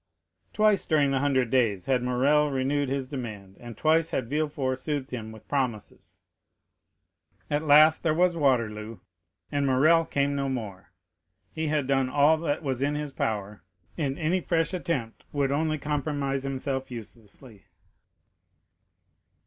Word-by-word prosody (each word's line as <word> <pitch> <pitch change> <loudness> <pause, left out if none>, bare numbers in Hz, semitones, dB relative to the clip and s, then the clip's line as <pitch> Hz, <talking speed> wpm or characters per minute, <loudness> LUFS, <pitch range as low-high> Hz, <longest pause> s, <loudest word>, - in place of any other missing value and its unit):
Twice 215 -2 +2
during 145 -3 +3
the 135 - +1
Hundred 130 -4 +1
Days 110 -8 +1
had 130 -2 +1
Morrel 140 +4 +2
renewed 140 +1 0
his 135 -1 -2
demand, 110 -8 -7
and 120 -2 -10
twice 160 +3 +2
had 130 -1 -3
Villefort 145 -4 -1
soothed 145 -1 -3
him 110 -3 -5
with 110 -1 -14
promises. 125 -7 -4 1.3
At 145 +2 0
last 155 +2 +6
there 160 - +1
was 180 +1 +3
Waterloo, 115 -7 0 0.5
and 140 -1 0
Morrel 155 +6 +4
came 140 -1 0
no 140 -1 -1
more; 105 -9 -6 0.6
he 160 0 -3
had 150 -2 0
done 135 -1 +1
all 145 +4 +4
that 155 -1 -2
was 130 -3 -2
in 145 +1 0
his 150 -1 -4
power, 105 -5 -3 0.3
and 140 -3 -2
any 175 +3 0
fresh 165 +1 0
attempt 145 -11 -3
would 140 -2 0
only 155 +2 0
compromise 145 -2 -2
himself 135 0 -3
uselessly. 115 -1 -11
140 Hz, 140 wpm, -27 LUFS, 125-150 Hz, 1.3 s, last